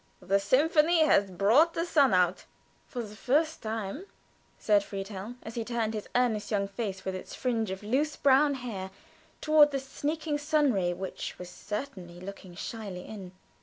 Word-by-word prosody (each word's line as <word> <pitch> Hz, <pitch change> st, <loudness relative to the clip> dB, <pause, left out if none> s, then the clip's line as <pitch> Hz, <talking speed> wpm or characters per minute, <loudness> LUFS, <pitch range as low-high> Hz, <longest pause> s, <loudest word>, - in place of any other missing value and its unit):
The 195 Hz, +2 st, +1 dB
symphony 310 Hz, -, +4 dB
has 200 Hz, -9 st, +4 dB
brought 225 Hz, -, +4 dB
the 335 Hz, -, 0 dB
sun 290 Hz, -7 st, +4 dB
out." 180 Hz, -1 st, +2 dB, 0.4 s
"For 245 Hz, -2 st, -4 dB
the 210 Hz, -1 st, -10 dB
first 310 Hz, +8 st, +1 dB
time," 220 Hz, -, -4 dB, 0.5 s
said 205 Hz, -2 st, +3 dB
Friedhelm, 200 Hz, +3 st, -6 dB
as 225 Hz, -, -7 dB
he 230 Hz, -, -2 dB
turned 225 Hz, -1 st, -2 dB
his 210 Hz, -2 st, -5 dB
earnest 240 Hz, -4 st, +1 dB
young 200 Hz, -2 st, 0 dB
face 195 Hz, -2 st, -5 dB
with 190 Hz, -, -2 dB
its 185 Hz, -, -7 dB
fringe 230 Hz, -5 st, -1 dB
of 190 Hz, +2 st, -5 dB
loose 275 Hz, +8 st, 0 dB
brown 280 Hz, +1 st, +4 dB
hair 220 Hz, -7 st, -5 dB, 0.5 s
toward 305 Hz, -1 st, +6 dB
the 280 Hz, -, -2 dB
sneaking 295 Hz, +3 st, -3 dB
sun 295 Hz, -2 st, +2 dB
ray, 180 Hz, -3 st, +1 dB
which 185 Hz, +1 st, -5 dB
was 180 Hz, 0 st, -9 dB
certainly 205 Hz, -6 st, -6 dB
looking 185 Hz, -1 st, -9 dB
shyly 200 Hz, -2 st, -6 dB
in. 190 Hz, -4 st, -9 dB
220 Hz, 165 wpm, -29 LUFS, 195-285 Hz, 0.5 s, toward